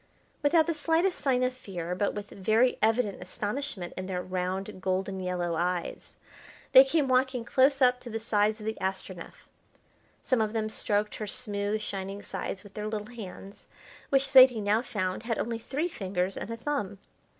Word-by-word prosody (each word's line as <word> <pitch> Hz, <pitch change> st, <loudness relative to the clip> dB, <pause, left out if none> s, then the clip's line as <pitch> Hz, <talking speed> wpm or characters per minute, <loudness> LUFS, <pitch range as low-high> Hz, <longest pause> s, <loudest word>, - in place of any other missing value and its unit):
Without 315 Hz, +2 st, +4 dB
the 335 Hz, -, 0 dB
slightest 330 Hz, +4 st, +1 dB
sign 260 Hz, -3 st, +1 dB
of 255 Hz, 0 st, +1 dB
fear, 180 Hz, -8 st, -5 dB
but 200 Hz, +3 st, -1 dB
with 205 Hz, 0 st, -6 dB
very 220 Hz, +6 st, +2 dB
evident 220 Hz, -3 st, +1 dB
astonishment 205 Hz, +1 st, -4 dB
in 185 Hz, 0 st, -5 dB
their 180 Hz, -1 st, -3 dB
round 185 Hz, +1 st, -3 dB
golden 190 Hz, +1 st, -1 dB
yellow 180 Hz, -2 st, -2 dB
eyes, 175 Hz, +1 st, -3 dB, 0.5 s
they 260 Hz, -, +10 dB
came 280 Hz, +1 st, +1 dB
walking 255 Hz, -2 st, +1 dB
close 270 Hz, +2 st, +3 dB
up 250 Hz, 0 st, +4 dB
to 245 Hz, -, -9 dB
the 225 Hz, -, -3 dB
sides 215 Hz, -1 st, +1 dB
of 210 Hz, -, -9 dB
the 220 Hz, 0 st, -2 dB
Astronef. 190 Hz, -2 st, -5 dB, 0.8 s
Some 255 Hz, -4 st, +2 dB
of 215 Hz, 0 st, -1 dB
them 220 Hz, -1 st, -1 dB
stroked 210 Hz, -1 st, -1 dB
her 215 Hz, -, -5 dB
smooth, 205 Hz, -1 st, -1 dB
shining 195 Hz, 0 st, -5 dB
sides 190 Hz, -, -5 dB
with 205 Hz, -, -14 dB
their 210 Hz, 0 st, -4 dB
little 215 Hz, +2 st, -5 dB
hands, 195 Hz, -2 st, -10 dB, 0.4 s
which 275 Hz, -1 st, +3 dB
Zaidie 260 Hz, -3 st, +8 dB
now 210 Hz, +2 st, +2 dB
found 185 Hz, -6 st, -3 dB
had 230 Hz, 0 st, -2 dB
only 230 Hz, 0 st, -2 dB
three 285 Hz, +8 st, -2 dB
fingers 190 Hz, -, -2 dB
and -, -, -5 dB
a 230 Hz, -, -4 dB
thumb. 230 Hz, -6 st, -3 dB
215 Hz, 175 wpm, -28 LUFS, 190-255 Hz, 0.8 s, they